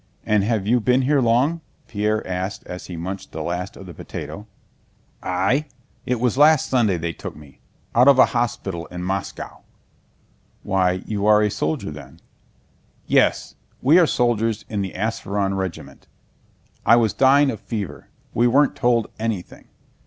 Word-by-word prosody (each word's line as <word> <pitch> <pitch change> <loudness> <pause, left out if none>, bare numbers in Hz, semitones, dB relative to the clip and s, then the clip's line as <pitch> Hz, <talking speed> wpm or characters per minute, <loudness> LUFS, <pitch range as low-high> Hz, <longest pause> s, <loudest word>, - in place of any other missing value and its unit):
"And 105 -2 +2
have 105 -2 0
you 120 +4 +3
been 125 +3 +2
here 140 +1 +2
long?" 130 +8 +2 0.3
Pierre 105 -1 -1
asked 95 +2 -4
as 90 0 -8
he 90 - -7
munched 95 +4 -6
the 80 - -4
last 90 +3 -4
of 95 - -10
the 90 - -10
potato. 105 +6 -8 0.7
"I? 110 +12 0 0.4
It 125 -2 0
was 125 +2 0
last 150 -1 +5
Sunday 110 -8 +2
they 85 0 -3
took - - -8
me, 75 -3 -16 0.3
out 125 +3 +5
of 140 -2 +7
a 130 - +8
hospital 120 -8 -2
in 90 0 -7
Moscow." 95 +1 -4 1.0
"Why, 95 -1 +2
are 95 - -7
you 105 -1 -2
a 105 0 +4
soldier 80 -3 -2
then?" - - -11 0.9
"Yes, - - +2 0.3
we 150 +7 +5
are 170 - +5
soldiers 115 -4 0
of 105 -2 -1
the 95 -2 -4
Ápsheron 100 -1 -2
regiment. 95 -3 -6 0.8
I 115 - +6
was 115 -3 +2
dying 135 +1 +4
of - - -7
fever. 100 -10 -6 0.3
We 120 +2 +3
weren't 140 +4 +3
told 120 -3 +2
anything. 110 -5 -4
105 Hz, 160 wpm, -22 LUFS, 95-125 Hz, 1.0 s, a